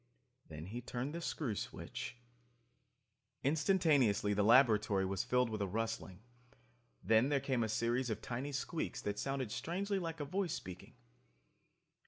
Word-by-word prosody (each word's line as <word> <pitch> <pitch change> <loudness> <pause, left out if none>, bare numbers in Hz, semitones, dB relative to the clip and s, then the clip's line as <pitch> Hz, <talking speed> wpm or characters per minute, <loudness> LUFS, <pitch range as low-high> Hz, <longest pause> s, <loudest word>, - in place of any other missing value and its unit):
Then 80 0 -8
he 115 +6 -5
turned 125 +4 -4
the 170 - -4
screw 145 -8 -2
switch... 105 - -5 1.3
Instantaneously 145 - +3
the 105 - +2
laboratory 110 -4 +5
was 95 0 -1
filled 125 -2 +2
with 110 - -3
a 100 - 0
rustling. 110 -2 -3 0.8
Then 110 +4 +4
there 145 -1 +2
came 130 -3 0
a 110 - -1
series 120 +3 0
of 110 - -2
tiny 130 +4 -4
squeaks 145 +4 -3
that 105 0 -2
sounded 135 -4 -2
strangely 195 - -1
like 165 -2 -4
a 145 - -2
voice 185 +2 -1
speaking. 90 -1 -9
120 Hz, 145 wpm, -36 LUFS, 105-145 Hz, 1.3 s, laboratory